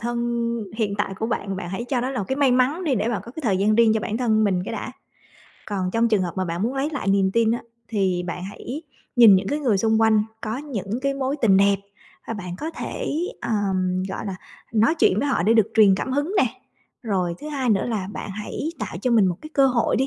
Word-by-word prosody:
thân 240 +1 -2 0.4
hiện 210 -3 0
tại 200 -1 -1
của 220 - -1
bạn, 200 -4 -2
bạn 175 -2 -5
hãy 195 +6 -4
cho 245 0 -1
nó 255 +2 -2
là 260 - -3
một 200 - -1
cái 265 - -1
may 280 -2 +3
mắn 265 +8 +2
đi 290 -5 +2
để 225 0 0
bạn 220 -5 -1
có 235 - -10
cái 315 - -7
thời 200 -6 +2
gian 210 +3 +2
riêng 230 -1 +5
cho 220 - +1
bản 210 - -3
thân 220 -3 +2
mình 185 -3 +1
cái - - -5
đã. - - -5 0.7
Còn 190 -3 -2
trong 230 +3 +2
trường 215 -4 +2
hợp 175 -2 -2
mà 185 - 0
bạn 170 +2 -3
muốn 245 +4 -1
lấy 275 +3 -1
lại 285 -9 -3
niềm 195 -1 +3
tin 230 0 +3
á 235 - -1 0.3
thì 190 -5 0
bạn 180 +1 -4
hãy 245 - -7 0.3
nhìn 230 -5 +9
những 190 +1 -1
cái 290 - 0
người 245 -9 +1
xung 220 +2 +2
quanh 220 -1 +4 0.2
có 220 +2 -3
những 240 -6 -4
cái 275 0 0
mối 275 +1 -1
tình 195 -4 +5
đẹp, 200 0 +4 0.5
à, 230 - -5
bạn 180 -4 -6
có 315 - -4
thể, - - -4 0.3
ờm, 185 -4 0
gọi 190 - -5
là, 190 -2 -4 0.4
nói 225 +6 +3
chuyện 215 - +3
với 285 - 0
họ 265 - +1
để 220 +5 +4
được 220 -2 +4
truyền 210 -3 +6
cảm 255 +7 -3
hứng 290 +8 -1
nè. 265 - +5 0.6
Rồi 185 -7 -1
thứ 300 - -6
hai 270 -5 -1
nữa 200 -3 +2
là 210 -5 -2
bạn - - -6
hãy 210 +9 -4
tạo 210 -6 -5
cho 250 - +1
mình 220 -5 +5
một 175 -2 -1
cái 310 - -9
cơ 275 -2 +4
hội 245 -3 +1
đi, 265 - +1
220 Hz, 260 wpm, -23 LUFS, 195-255 Hz, 0.7 s, nhìn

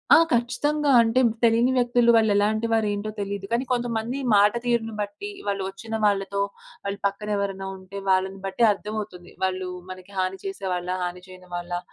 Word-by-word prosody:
ఆ! - - +9 0.2
ఖచ్చితంగా 280 +5 +1
అంటే 230 +2 +3 0.2
తెలియని 235 +2 +4
వ్యక్తులు 240 -1 +4
వాళ్ళేలాంటి 215 0 +3
వారు 220 -2 +2
ఏంటో 205 +1 -3
తెలియదు. 200 -1 -3
కానీ, 235 +2 +1
కొంతమంది 240 +1 -1 0.2
మాట 205 +1 +6
తీరును 235 -2 0
బట్టి, 205 - -5 0.2
వాళ్ళు 200 -1 -1
వచ్చిన 220 +3 -6
వాళ్ళతో 200 -1 +1 0.4
వాళ్ళు 200 0 -3
పక్కన 210 +2 -5
ఎవరైనా 195 -1 -3
ఉంటే 190 +1 -8
వాళ్ళని 190 +1 +1
బట్టి 195 +5 0
అర్థమవుతుంది. 205 -3 -6
వాళ్ళు 185 0 -1 0.2
మనకి 185 +1 -10
హాని 185 +1 -1
చేసే 195 0 -5
వాళ్ళా? 180 +1 -2
హాని 180 0 -4
చేయని 185 -1 -14
వాళ్ళా? 175 0 -3
205 Hz, 160 wpm, -25 LUFS, 190-230 Hz, 0.4 s, ఆ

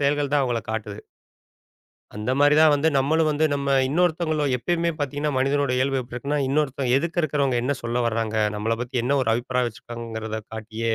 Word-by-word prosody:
செயல்கள் 145 0 +1
தான் 145 - +3
அவங்கள 120 -3 0
காட்டுது. 105 -1 -4 1.2
அந்த 105 +4 -3
மாதிரி 145 +1 +5
தான் 160 -1 +7
வந்து, 145 +3 +2
நம்மளும் 155 +4 +2
வந்து 150 +1 +1
நம்ம 140 -1 -1
இன்னொருத்தங்களும் 155 -2 +1
எப்பவுமே 170 +6 0
பார்த்தீங்கன்னா, 145 +1 -2
மனிதனோட 140 0 +1
இயல்பு 135 +1 +1
எப்படி 120 - -12
இருக்குனா, 140 +4 -2
இன்னொருத்தன் 135 -3 0
எதுக்க 170 +3 -1
இருக்கறவங்க 140 -4 +1
என்ன 140 +3 0
சொல்ல 120 +1 -1
வர்றாங்க? 115 -1 -1 0.2
நம்மள 115 +2 -1
பத்தி 125 +1 -6
என்ன 140 +4 +1
ஒரு 115 - 0
அபிப்ராயம் 125 +1 -1
வச்சிருக்கிறாங்ககறத 110 -1 -6
காட்டியே, 110 +1 -3
135 Hz, 170 wpm, -24 LUFS, 115-145 Hz, 1.2 s, தான்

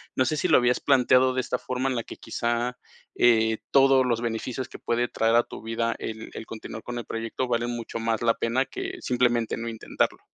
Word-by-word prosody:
No 130 - +3
sé 155 - 0
si 180 - +1
lo 160 - +6
habías 125 0 +2
planteado 130 -1 +4
de 130 - +1
esta 125 - -2
forma 130 +1 -2
en 130 - -1
la 115 - -2
que - - -10
quizá, 120 +1 -2 0.4
eh, 110 -2 +4
todos 135 -1 +5
los 120 -2 0
beneficios 120 +2 -3
que - - -9
puede 120 +1 0
traer 115 0 +1
a 120 - +5
tu - - -10
vida 115 +1 -1
el 110 0 -6
el 110 - -7
continuar 110 0 -8
con 120 0 -5
el - - -7
proyecto 115 +3 -3
valen 120 0 0
mucho 115 -1 -5
más 115 0 -1
la 115 -1 +3
pena 125 +3 0
que - - -6
simplemente 120 -2 +1
no 115 - -4
intentarlo. 115 -1 -2
120 Hz, 220 wpm, -26 LUFS, 115-125 Hz, 0.4 s, lo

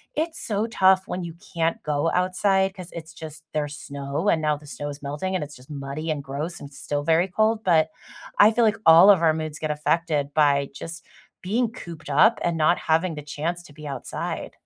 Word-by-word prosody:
it's 320 +2 -2
so 215 +1 -1
tough 190 -3 +4
when 185 - -4
you 170 - -6 0.2
can't 165 0 0
go 150 +2 0
outside 190 +1 +2
'cause 180 -2 -10
it's 165 -1 -8
just 155 -1 -10
there's 150 -1 -2
snow 140 +5 -3
and 160 - +2
now 150 -1 +1
the 150 +1 -13
snow 145 0 -6
is 145 0 -8
melting 150 +7 -3
and 180 - -1
it's 150 0 -9
just 125 +1 -17
muddy 145 +2 -5
and 145 -2 -3
gross 145 +6 -5
and 145 - -9
still 145 0 -3
very 165 +4 +3
cold. 215 +4 +1
But 160 -3 +4 0.5
I 210 +2 +8
feel 235 +1 +2
like 215 0 +2
all 165 +5 +9
of 190 -4 +6
our 160 -2 +4
moods 155 -1 -5
get 155 - -3
affected 150 -1 0
by 140 -2 +3
just 165 +3 -8 0.4
being 225 +5 0
cooped 170 - -9
up 210 +11 +4
and 170 -1 0
not 160 +2 +3
having 165 +1 0
the 150 - -6
chance 165 +4 -4
to 145 - -16
be 150 +1 -11
outside. 135 -3 -5
160 Hz, 215 wpm, -24 LUFS, 150-185 Hz, 0.5 s, all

